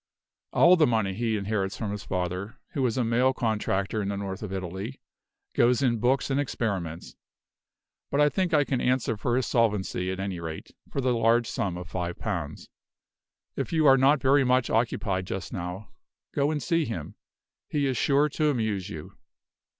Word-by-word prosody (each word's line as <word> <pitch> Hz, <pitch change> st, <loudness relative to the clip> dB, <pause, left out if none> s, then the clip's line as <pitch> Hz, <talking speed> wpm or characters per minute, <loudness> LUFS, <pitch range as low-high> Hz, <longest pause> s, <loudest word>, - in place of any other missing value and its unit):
All 175 Hz, +2 st, +6 dB
the 155 Hz, -, +5 dB
money 110 Hz, -5 st, +1 dB
he 110 Hz, +1 st, 0 dB
inherits 100 Hz, -1 st, -2 dB
from 110 Hz, -3 st, -3 dB
his 105 Hz, -1 st, -5 dB
father, 90 Hz, +3 st, -3 dB
who 140 Hz, -, -3 dB
was 125 Hz, -2 st, +1 dB
a 125 Hz, -, +2 dB
mail 120 Hz, +3 st, +2 dB
contractor 105 Hz, -3 st, -1 dB
in 100 Hz, -, -2 dB
the 100 Hz, -, -2 dB
north 95 Hz, -1 st, -5 dB
of 105 Hz, -3 st, -5 dB
Italy, 95 Hz, +6 st, -5 dB, 0.5 s
goes 120 Hz, +2 st, +3 dB
in 120 Hz, -3 st, +2 dB
books 130 Hz, +4 st, +1 dB
and 135 Hz, -, +1 dB
experiments; 95 Hz, -, -3 dB, 0.9 s
but 140 Hz, -, 0 dB
I 150 Hz, -, +6 dB
think 175 Hz, +5 st, 0 dB
I 150 Hz, -2 st, +4 dB
can 135 Hz, -3 st, -1 dB
answer 125 Hz, -3 st, +1 dB
for 120 Hz, +3 st, -1 dB
his 130 Hz, -, +1 dB
solvency, 105 Hz, -6 st, 0 dB
at 95 Hz, -, -5 dB
any 95 Hz, -2 st, -3 dB
rate, 80 Hz, -1 st, -7 dB, 0.2 s
for 140 Hz, -, -1 dB
the 125 Hz, -1 st, +2 dB
large 115 Hz, +1 st, +3 dB
sum 90 Hz, -3 st, -2 dB
of 90 Hz, -, -7 dB
five 90 Hz, -1 st, -4 dB
pounds. 85 Hz, -9 st, -4 dB, 0.9 s
If -, -, -3 dB
you 160 Hz, -2 st, +2 dB
are 135 Hz, -2 st, +8 dB
not 135 Hz, +2 st, +4 dB
very 135 Hz, +2 st, +4 dB
much 125 Hz, -1 st, +2 dB
occupied 100 Hz, -5 st, 0 dB
just 95 Hz, 0 st, -5 dB
now, 90 Hz, +2 st, -5 dB, 0.4 s
go 140 Hz, 0 st, +2 dB
and 150 Hz, -3 st, -2 dB
see 165 Hz, +7 st, +2 dB
him. 90 Hz, -10 st, -5 dB, 0.6 s
He 145 Hz, -2 st, 0 dB
is 130 Hz, -2 st, 0 dB
sure 140 Hz, +3 st, +3 dB
to 150 Hz, +1 st, 0 dB
amuse 110 Hz, -7 st, -1 dB
you." 80 Hz, -7 st, -8 dB
115 Hz, 185 wpm, -27 LUFS, 95-130 Hz, 0.9 s, are